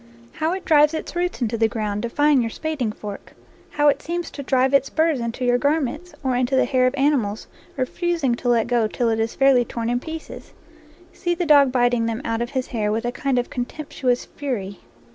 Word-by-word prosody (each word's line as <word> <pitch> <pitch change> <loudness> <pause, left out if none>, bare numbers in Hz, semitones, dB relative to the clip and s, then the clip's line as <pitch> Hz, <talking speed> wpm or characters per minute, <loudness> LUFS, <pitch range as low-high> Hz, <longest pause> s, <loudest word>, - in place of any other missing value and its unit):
How 320 +2 -1
it 375 -1 -5
drives 300 0 +5
its 315 - -6
roots 350 -6 -1
into 230 0 -2
the 225 - +4
ground, 210 -2 -3
defying 285 +3 +2
your 230 - -1
spading 285 -4 -3
f - - -18
ork! 205 -1 -8 0.3
How 295 0 +1
it 290 - +3
seems 345 +1 -4
to 285 - -7
drive 260 0 +1
its 275 0 +3
burrs 320 -3 +1
into 235 +2 -3
your 245 0 +3
garments, 300 +3 -1
or 260 -2 0
into 250 +1 +1
the 260 - +4
hair 255 -2 +2
of 255 - -1
animals, 265 -7 +1 0.3
refusing 300 +1 0
to 245 +1 -2
let 235 -2 +3
go 240 -2 +1
till 235 +2 -1
it 225 0 0
is 225 +1 -1
fairly 270 -2 +4
torn 230 0 -3
in 245 - +1
pieces! 320 +3 -9 0.6
See 350 -1 -1
the 350 - -1
dog 285 -4 +6
biting 245 -2 +2
them 230 +3 -3
out 230 0 -1
of 240 - -2
his 260 -1 -2
hair 210 -3 -2
with 225 +2 -1
a 240 - 0
kind 270 +1 -1
of 245 - -1
contemptuous 250 -1 -2
fury. 205 -9 -5
255 Hz, 220 wpm, -22 LUFS, 235-295 Hz, 0.6 s, dog